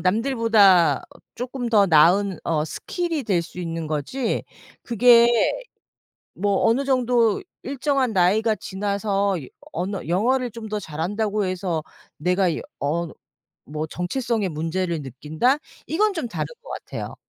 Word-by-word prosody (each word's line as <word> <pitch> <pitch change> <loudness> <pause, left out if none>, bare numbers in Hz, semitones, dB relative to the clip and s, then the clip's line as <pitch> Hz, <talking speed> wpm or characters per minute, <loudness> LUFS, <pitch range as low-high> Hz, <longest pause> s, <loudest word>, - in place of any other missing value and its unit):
남들보다 210 -3 +4 0.3
쪼끔 250 0 -4
더 205 -3 +5
나은 180 +3 +4
어 155 -2 0
스킬이 330 - -3
될 195 -5 +1
수 170 +2 -12
있는 165 -2 -4
거지, 155 - -2 0.4
그게 235 0 +6 1.1
뭐 200 0 +1
어느 250 +5 +3
정도 245 - +2 0.2
일정한 270 -2 0
나이가 210 +4 +3
지나서 200 -1 -1
여 - - -10 0.2
언어 185 +3 -3
영어를 245 +8 +1
좀 225 0 -8
더 210 0 -2
잘한다고 205 +6 -2
해서 180 -4 -2 0.3
내가 180 +3 +2
이 165 - -2 0.2
어 165 +4 -1 0.6
뭐 155 +1 -4
정체성의 215 - -2
문제를 165 +1 -2
느낀다? 155 - 0 0.3
이건 415 +7 +2
좀 325 -9 -3
다른 - - -3 0.2
것 - - -14
같아요. - - -6
200 Hz, 255 characters per minute, -23 LUFS, 170-240 Hz, 1.1 s, 그게